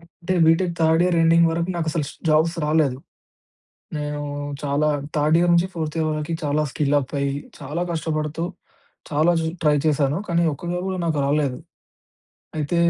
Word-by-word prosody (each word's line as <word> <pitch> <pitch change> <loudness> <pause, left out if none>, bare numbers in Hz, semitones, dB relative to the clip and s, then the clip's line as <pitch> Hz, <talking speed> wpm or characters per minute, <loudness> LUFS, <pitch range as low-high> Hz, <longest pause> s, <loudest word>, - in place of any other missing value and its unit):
అంటే 170 +2 -5
BTech 170 +2 +3
third 160 +1 +4
year 180 -1 +2
ending 165 +1 +5
వరకు 170 +2 -1
నాకు 165 -2 -1
అసలు 155 -1 -1
స్ - - -14
జాబ్స్ 160 +2 +3
రాలేదు. 150 -4 +2 1.0
నేను 150 0 -3 0.4
చాలా 145 +1 +1 0.3
థర్డ్ 150 +1 +3
ఇయర్ 175 - +3
నుంచి 170 +2 +3
ఫోర్త్ 160 -2 -4
ఇయర్ 160 -1 +1
వరకి 155 +2 -3
చాలా 150 +1 +1
స్కిల్ 145 0 +1
అప్ 135 - -7
అయ్యి 140 0 0 0.3
చాలా 150 +4 -4
కష్టపడుతూ 155 -1 -2 0.7
చాలా 155 +3 +3
చ్ - - -2 0.2
ట్రై 150 -1 +4
చేశాను. 145 -1 +2
కానీ 170 0 +2
ఒక్కటిలో 175 +5 -4
కూడా 190 -1 -2
నాకు 160 -2 0
రాలేదు. 140 -2 +1 1.0
అయితే 150 +3 -1
155 Hz, 165 wpm, -22 LUFS, 150-170 Hz, 1.0 s, ending